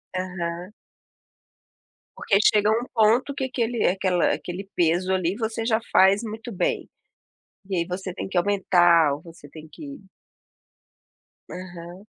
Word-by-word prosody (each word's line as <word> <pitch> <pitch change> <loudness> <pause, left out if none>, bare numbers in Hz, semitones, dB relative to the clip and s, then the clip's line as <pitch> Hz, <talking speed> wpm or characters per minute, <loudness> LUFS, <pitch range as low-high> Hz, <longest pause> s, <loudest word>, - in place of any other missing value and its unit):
Aham. 180 0 -4 1.4
Porque 200 - +1
chega 210 -1 +4
a - - +4
um 235 +2 -1
ponto 230 +6 +3
que 270 -1 -3
aquele 240 -2 -1
aquela 185 -1 +1
aquele 190 +2 -6
peso 175 +2 +1
ali, 185 0 0
você 225 0 -3
já 220 -1 +2
faz 195 +2 +5
muito 225 +2 -7
bem, 190 - -1 0.8
e 190 - -1
aí 170 - 0
você 185 0 -5
tem - - -5
que 190 - -3
aumentar 175 -5 +4
ou 145 - -6
você 165 -4 -14
tem 155 +1 -12
que 280 - -10 1.5
Aham. 180 +1 -9
190 Hz, 140 wpm, -24 LUFS, 175-220 Hz, 1.5 s, faz